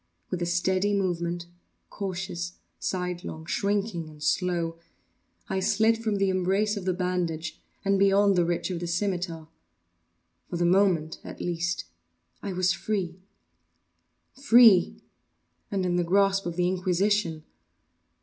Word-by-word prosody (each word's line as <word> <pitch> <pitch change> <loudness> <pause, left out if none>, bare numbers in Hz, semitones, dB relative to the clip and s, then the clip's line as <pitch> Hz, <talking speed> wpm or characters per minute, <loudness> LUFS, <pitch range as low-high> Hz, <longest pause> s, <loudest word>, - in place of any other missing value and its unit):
With 180 -2 -2
a 175 - 0
steady 185 +3 +1
movement—cautious, 175 0 -4 0.3
sidelong, 180 -3 -4
shrinking, 200 -3 -1
and 150 -1 -12
slow—I 170 +3 -3
slid 220 +4 +2
from 215 -2 0
the 195 -1 +2
embrace 195 +3 +1
of 200 -3 -5
the 185 - +1
bandage 175 -3 -2 0.2
and 195 0 +3
beyond 200 0 +4
the 175 - +4
reach 170 +2 -1
of 175 - -3
the 175 - -4
scimitar. 175 -3 -2 1.0
For 175 - -3
the 175 - +1
moment, 175 -4 +2
at - - -9
least, 175 0 -2 0.6
I 200 - -4
was 185 0 +2
free. 190 -5 -3 1.1
Free!—and 225 -5 +2
in 175 -1 +1
the 175 - +2
grasp 195 +2 +2
of 170 - -4
the 180 0 +1
Inquisition! 185 -2 0
180 Hz, 120 wpm, -27 LUFS, 175-195 Hz, 1.1 s, beyond